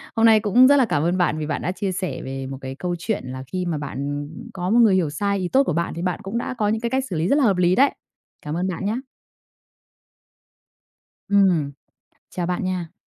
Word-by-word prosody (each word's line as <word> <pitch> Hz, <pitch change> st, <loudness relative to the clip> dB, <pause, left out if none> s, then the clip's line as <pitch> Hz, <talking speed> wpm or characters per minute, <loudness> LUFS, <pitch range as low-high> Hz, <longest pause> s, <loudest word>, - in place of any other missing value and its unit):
Hôm 225 Hz, 0 st, +4 dB
nay 220 Hz, -1 st, +7 dB
cũng 225 Hz, +5 st, +5 dB
rất 285 Hz, -, +6 dB
là 260 Hz, -, +4 dB
cảm 150 Hz, -8 st, 0 dB
ơn 175 Hz, +2 st, +1 dB
bạn 175 Hz, -3 st, +1 dB
vì 155 Hz, -, -3 dB
bạn -, -, -2 dB
đã 180 Hz, -, -1 dB
chia 195 Hz, 0 st, -3 dB
sẻ 185 Hz, 0 st, -3 dB
về 135 Hz, 0 st, -5 dB
một 135 Hz, 0 st, -6 dB
cái 130 Hz, 0 st, -6 dB
câu 175 Hz, +4 st, -3 dB
chuyện 215 Hz, -, -2 dB
là 130 Hz, +1 st, -6 dB
khi 185 Hz, -1 st, -2 dB
mà 170 Hz, -3 st, -1 dB
bạn, 145 Hz, -2 st, -6 dB, 0.3 s
ừm, 150 Hz, +2 st, -10 dB
có 180 Hz, 0 st, -3 dB
một 235 Hz, -, +4 dB
người 215 Hz, -5 st, +6 dB
hiểu 170 Hz, -5 st, +1 dB
sai 200 Hz, +6 st, -1 dB
ý 180 Hz, -, -1 dB
tốt 270 Hz, +8 st, +3 dB
của 175 Hz, -, -1 dB
bạn 170 Hz, +1 st, -1 dB
thì 170 Hz, -, -4 dB
bạn 180 Hz, 0 st, -1 dB
cũng 200 Hz, +5 st, -3 dB
đã 240 Hz, -, -3 dB
có 210 Hz, -, +1 dB
những 220 Hz, +2 st, 0 dB
cái 235 Hz, -, -1 dB
cách 265 Hz, +2 st, 0 dB
xử 180 Hz, -, -3 dB
lý 160 Hz, +2 st, 0 dB
rất 280 Hz, -, +3 dB
là 290 Hz, -, +3 dB
hợp 200 Hz, -6 st, +3 dB
lý 180 Hz, 0 st, +3 dB
đấy. 275 Hz, +6 st, +4 dB, 0.5 s
Cảm 150 Hz, -, -3 dB
ơn 180 Hz, -, -1 dB
bạn 185 Hz, +1 st, -4 dB
nhá. 215 Hz, +3 st, 0 dB, 2.3 s
Ừm, 185 Hz, -8 st, +3 dB, 0.6 s
chào 180 Hz, -2 st, -3 dB
bạn 180 Hz, 0 st, -2 dB
nha. 180 Hz, -2 st, -3 dB
185 Hz, 250 wpm, -22 LUFS, 165-210 Hz, 2.3 s, nay